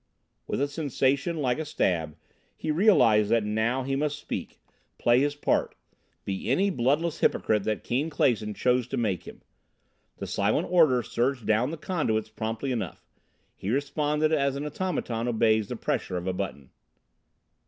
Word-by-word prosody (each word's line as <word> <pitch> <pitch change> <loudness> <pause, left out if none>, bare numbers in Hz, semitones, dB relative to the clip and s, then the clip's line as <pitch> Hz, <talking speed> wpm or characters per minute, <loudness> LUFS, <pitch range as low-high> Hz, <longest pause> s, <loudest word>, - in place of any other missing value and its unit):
With - - -2
a 140 - +1
sensation 140 +1 0
like 125 +2 +1
a - - -1
stab 85 - -1 0.4
he 155 - -2
realized 135 - +4
that 115 -1 +3
now 110 +5 0
he 135 +1 -1
must 150 +1 -1
speak, - - -6 0.4
play 120 +1 +4
his 145 +1 +1
part, 145 - 0 0.5
be 95 +3 -3
any 195 +10 +2
bloodless 150 +4 0
hypocrite 105 -2 +1
that 110 -1 -1
Keane 135 +7 -1
Clason 110 -8 +1
chose 125 -1 +1
to 135 - -3
make 105 -7 -1
him. - - -11 0.7
The - - -5
silent - - 0
order 155 -9 +5
surged 125 0 -1
down 110 +4 +2
the 165 - -5
conduits 130 -11 -1
promptly 110 +4 -3
enough; 110 -9 -4 0.5
he 95 - -5
responded 150 +4 0
as 140 -3 +1
an 140 +2 -4
automaton 145 -8 -2
obeys 110 -2 +2
the - - -4
pressure 90 - -2
of 90 - -5
a 95 - -1
button. 90 -8 -5
125 Hz, 160 wpm, -27 LUFS, 110-145 Hz, 0.7 s, order